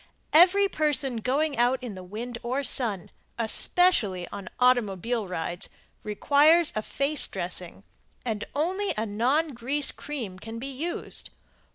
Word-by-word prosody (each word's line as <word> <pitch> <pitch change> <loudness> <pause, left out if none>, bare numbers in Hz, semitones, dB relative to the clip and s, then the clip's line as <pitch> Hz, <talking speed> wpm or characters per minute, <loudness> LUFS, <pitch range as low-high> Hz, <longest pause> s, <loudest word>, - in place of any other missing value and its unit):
Every 370 +5 +6
person 295 -7 -1
going 275 +4 0
out 245 +2 +3
in 240 -4 -5
the 185 - -9
sun 215 +7 -7
or 240 +2 -3
wind, 220 -9 -1 0.3
especially 220 - +2
on 200 -2 -8
automobile 235 -3 +1
rides, 175 0 -3 0.3
requires 295 +10 +3
a 215 - 0
face 280 +6 +3
dressing, 180 - -4 0.4
and 215 -3 -2
only 375 +7 0
a 220 - 0
non 250 +10 +1
grease 270 +3 +2
cream 235 -11 -6
can 225 +3 -7
be 270 +4 -6
used. 320 +7 -5
245 Hz, 135 wpm, -26 LUFS, 205-295 Hz, 0.4 s, Every